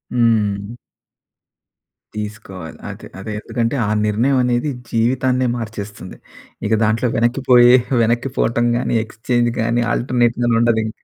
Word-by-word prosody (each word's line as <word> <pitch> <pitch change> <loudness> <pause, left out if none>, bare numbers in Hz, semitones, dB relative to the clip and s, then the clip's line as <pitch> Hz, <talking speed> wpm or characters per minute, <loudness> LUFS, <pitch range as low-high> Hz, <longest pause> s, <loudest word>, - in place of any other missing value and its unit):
హ్మ్. 105 -4 +1 1.5
తీసుకోవాలి. 105 -5 -7
అదే - - -9
అదే 110 +3 -6
ఎందుకంటే 115 +3 -2
ఆ - - -1 0.2
నిర్ణయం 115 +6 +1
అనేది 125 +3 0 0.2
జీవితాన్నే 125 +2 +1
మార్చేస్తుంది. 105 -4 -7 0.5
ఇక 110 - 0
దాంట్లో 110 +3 +1
వెనక్కిపోయే 120 +1 +5 0.3
వెనక్కిపోవటం 120 0 0
గాని, 120 - -1
ఎక్స్చేంజ్ 120 +2 -1
గాని, 120 +1 +1
ఆల్టర్‌నేట్ 120 -1 +1
గానీ 120 -1 +2
ఉండదు 115 -1 +2
ఇంకా. 110 - -8
115 Hz, 115 wpm, -19 LUFS, 110-120 Hz, 1.5 s, వెనక్కిపోయే